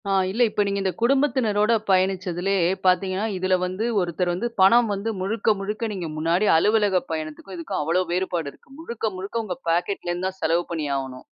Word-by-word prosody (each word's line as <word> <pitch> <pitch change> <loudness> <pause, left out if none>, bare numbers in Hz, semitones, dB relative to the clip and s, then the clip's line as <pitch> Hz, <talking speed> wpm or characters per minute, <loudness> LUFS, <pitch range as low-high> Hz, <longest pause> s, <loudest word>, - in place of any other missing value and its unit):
ஆ - - +1 0.2
இல்ல. 215 +6 -2
இப்போ 210 - -1
நீங்க 200 0 -1
இந்த 190 -1 0
குடும்பத்தினரோட 235 -5 +2 0.2
பயணிச்சதிலயே 185 0 +1 0.2
பாத்தீங்கன்னா, 185 +2 +2
இதில 185 0 +2
வந்து, 185 +4 -2 0.2
ஒருத்தர் 175 0 -1
வந்து 200 +7 -2
பணம் 230 +5 +6
வந்து 200 +3 -3
முழுக்க 215 +4 0
முழுக்க 210 +3 -3
நீங்க 180 -4 -4
முன்னாடி 165 +6 +1
அலுவலகப் 205 +1 +2
பயணத்துக்கும் 155 +4 -6
இதுக்கும் 165 -2 -3
அவ்ளோ 165 +5 +1
வேறுபாடு 175 -3 -1
இருக்கு. - - -25
முழுக்க 235 -8 -3
முழுக்க 205 +5 -3
உங்க 185 -4 -4
பாக்கெட்லேருந்து 175 +1 -1
தான் 190 0 -7
செலவு 170 +2 +2
பண்ணி 160 -3 -2
ஆவணும். 130 -2 -5
190 Hz, 170 wpm, -23 LUFS, 175-210 Hz, 0.2 s, பணம்